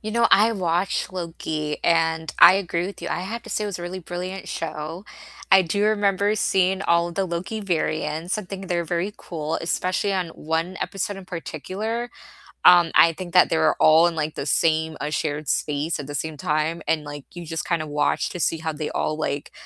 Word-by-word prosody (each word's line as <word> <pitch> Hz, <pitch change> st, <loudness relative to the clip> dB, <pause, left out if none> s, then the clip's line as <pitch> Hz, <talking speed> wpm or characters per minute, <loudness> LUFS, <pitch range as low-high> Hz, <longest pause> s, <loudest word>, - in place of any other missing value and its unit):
You 215 Hz, -, -5 dB
know, 235 Hz, 0 st, +4 dB
I 220 Hz, +3 st, +6 dB
watched 180 Hz, -2 st, -1 dB
Loki, 160 Hz, -4 st, -4 dB
and 160 Hz, -1 st, +1 dB
I 175 Hz, +2 st, +10 dB
agree 175 Hz, -2 st, -1 dB
with 200 Hz, -, -8 dB
you, 170 Hz, -, -3 dB
I -, -, -2 dB
have 220 Hz, +6 st, -5 dB
to -, -, -11 dB
say -, -, -1 dB
it -, -, -2 dB
was 200 Hz, -, -5 dB
a -, -, -7 dB
really 175 Hz, +2 st, -5 dB
brilliant 180 Hz, +2 st, -6 dB
show, 165 Hz, +3 st, -5 dB, 0.5 s
I 190 Hz, -, +8 dB
do 200 Hz, +4 st, 0 dB
remember 205 Hz, -1 st, +2 dB
seeing 190 Hz, -2 st, +1 dB
all 170 Hz, -1 st, +2 dB
of 170 Hz, -, -9 dB
the 195 Hz, -, 0 dB
Loki 185 Hz, +5 st, -4 dB
variants, 160 Hz, -2 st, -1 dB
and 200 Hz, -4 st, -7 dB
think 195 Hz, -1 st, -6 dB
they're 175 Hz, -1 st, 0 dB
very 175 Hz, +4 st, -2 dB
cool, 160 Hz, -1 st, -4 dB
especially 185 Hz, +4 st, -1 dB
on 185 Hz, -3 st, -1 dB
1 160 Hz, +4 st, -3 dB
episode 200 Hz, +1 st, -3 dB
in 195 Hz, -, -9 dB
particular, 195 Hz, +7 st, -4 dB, 0.5 s
um, 175 Hz, -2 st, +7 dB
I 165 Hz, -, +7 dB
think 175 Hz, +1 st, -8 dB
that 180 Hz, -, +6 dB
they 165 Hz, -, +2 dB
were 160 Hz, -1 st, +3 dB
all 160 Hz, +2 st, +6 dB
in, 170 Hz, -, -2 dB
like, 155 Hz, -1 st, -2 dB
the -, -, -4 dB
same 160 Hz, +1 st, +1 dB
a 150 Hz, -, -2 dB
shared 150 Hz, -1 st, -2 dB
space 150 Hz, +2 st, -1 dB
at 140 Hz, -, -6 dB
the 145 Hz, -, -6 dB
same 155 Hz, +2 st, -3 dB
time, 155 Hz, +3 st, -1 dB
and, 155 Hz, -2 st, +1 dB
like, 145 Hz, -1 st, -8 dB
you 175 Hz, -1 st, -8 dB
just 165 Hz, 0 st, -4 dB
kind 170 Hz, -2 st, 0 dB
of 155 Hz, -, -6 dB
watch 145 Hz, 0 st, 0 dB
to 180 Hz, -, -7 dB
see 165 Hz, -1 st, 0 dB
how 160 Hz, 0 st, -2 dB
they 150 Hz, 0 st, -4 dB
all, 155 Hz, -, -1 dB
like, 145 Hz, -2 st, -3 dB
170 Hz, 215 wpm, -23 LUFS, 155-190 Hz, 0.5 s, I